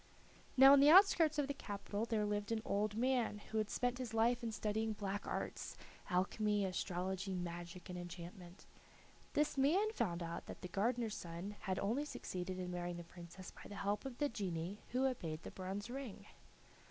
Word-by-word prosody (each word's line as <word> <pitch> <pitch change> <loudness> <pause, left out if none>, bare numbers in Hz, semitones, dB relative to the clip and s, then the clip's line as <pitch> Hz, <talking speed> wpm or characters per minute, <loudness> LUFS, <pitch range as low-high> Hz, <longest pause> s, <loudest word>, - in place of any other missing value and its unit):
Now 270 +1 +10
in 280 - +8
the 285 +2 +8
outskirts 330 -4 +7
of 290 -2 +2
the 285 - -1
capital 205 -3 -3
there 220 -3 +1
lived 205 +1 -1
an 220 -1 0
old 210 +1 0
man, 245 -2 +1
who 220 - +1
had 215 -1 0
spent 245 0 0
his 235 -3 -4
life 235 +2 +3
in 230 -1 -2
studying 220 +1 -1
black 205 -1 -3
arts - - -3 0.3
alchemy, 205 +3 +2
astrology, 190 +1 -2
magic, 175 0 -5
and 180 -1 -5
enchantment. 175 +1 -9 0.7
This 295 -1 +2
man 370 +11 +4
found 175 - -1
out 170 0 -5
that - - -8
the 180 - -6
gardener's 225 +3 0
son 175 +4 -6
had 190 -2 -2
only 245 +9 0
succeeded 185 -9 -4
in 180 -1 -3
marrying 175 0 -3
the 175 - -6
Princess 175 +2 -10
by - - -12
the 205 - -7
help 205 +1 -1
of 265 -3 -6
the 290 - +2
genii 190 -4 -3
who 255 +2 +1
obeyed 165 -12 -2
the - - -7
bronze 195 +3 -4
ring. 245 -6 -6
205 Hz, 185 wpm, -38 LUFS, 180-245 Hz, 0.7 s, Now